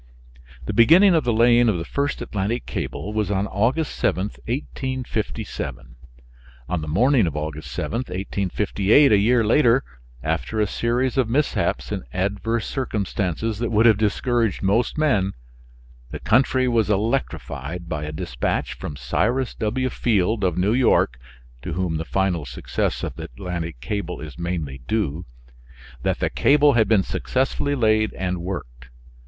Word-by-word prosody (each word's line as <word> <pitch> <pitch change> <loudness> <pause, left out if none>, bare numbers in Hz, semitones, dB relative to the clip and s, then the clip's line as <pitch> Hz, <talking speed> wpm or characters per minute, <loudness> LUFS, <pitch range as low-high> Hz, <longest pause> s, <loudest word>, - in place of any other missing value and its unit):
The 105 - -3
beginning 165 - +6
of 160 -4 +2
the 120 - +2
laying 120 +1 +5
of 100 - +1
the 85 - -4
first 140 +7 -2
Atlantic 105 +4 -2
cable 105 - -4
was 105 -3 0
on 100 0 0
Aug. 115 +11 +1
7, 95 - -1 0.2
1857. 110 - -4 0.7
On 90 -3 -2
the 75 - -6
morning 115 - +3
of 75 - -4
Aug. 75 0 -4
7, 115 - -4
1858, 100 - +1
a 105 - +6
year 115 +3 +3
later, 125 +2 +4 0.4
after 80 +8 -2
a 105 - +3
series 120 +6 0
of 120 -4 +1
mishaps 145 +5 0
and - - -2
adverse 100 +5 -1
circumstances 105 - -2
that 120 - -1
would 110 0 +3
have 110 -3 +5
discouraged 115 +1 0
most 105 +9 +1
men, 105 -11 +2 0.8
the - - -6
country 130 +2 +2
was 115 -3 +2
electrified 90 - -2
by 80 -3 -3
a 75 - -4
dispatch - - -2
from 75 - -7
Cyrus 120 - 0
W. 125 +4 -1
Field 105 -1 +1
of 90 -2 +1
New 95 +4 +2
York 120 - +3 0.4
(to 80 - -5
whom 85 -2 -1
the 80 - -4
final 95 -3 0
success 60 -2 -3
of - - -4
the - - -6
Atlantic 85 +3 -5
cable 90 +4 -4
is 75 0 -9
mainly 85 -6 -3
due), 95 -6 -1 0.7
that - - 0
the - - -1
cable 145 0 +4
had 110 -4 +3
been 105 -3 +4
successfully 135 +5 -1
laid 110 -3 +2
and 90 -1 -2
worked. 60 -10 -6
105 Hz, 150 wpm, -23 LUFS, 90-120 Hz, 0.8 s, beginning